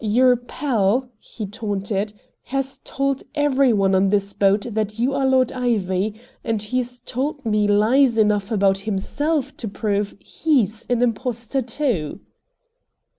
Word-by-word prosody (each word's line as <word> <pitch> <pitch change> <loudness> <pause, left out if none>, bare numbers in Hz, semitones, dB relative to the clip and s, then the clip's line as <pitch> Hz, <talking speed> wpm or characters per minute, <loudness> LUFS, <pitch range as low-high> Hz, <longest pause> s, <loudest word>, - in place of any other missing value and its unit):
Your 250 +4 +4
pal," 245 -1 0
he 215 - -7
taunted, 205 -1 -3 0.3
"has 270 0 -3
told 275 0 -1
every 275 -3 +3
one 195 -3 +2
on 190 +1 +3
this 200 0 0
boat 200 +1 +2
that 215 0 -2
you 250 +4 +1
are 275 -1 +1
Lord 260 -1 +3
Ivy, 215 -4 -1 0.2
and 225 -2 -1
he's 245 +4 -3
told 280 +2 -3
me 210 -2 +2
lies 225 +5 +4
enough 210 -2 +2
about 195 -2 +3
HIMSELF 280 +9 -1
to 225 - -5
prove 205 0 -2
HE'S 230 - 0
an 245 0 +2
impostor, 245 +1 -1
too!" 230 - -2
225 Hz, 135 wpm, -22 LUFS, 205-260 Hz, 0.3 s, Your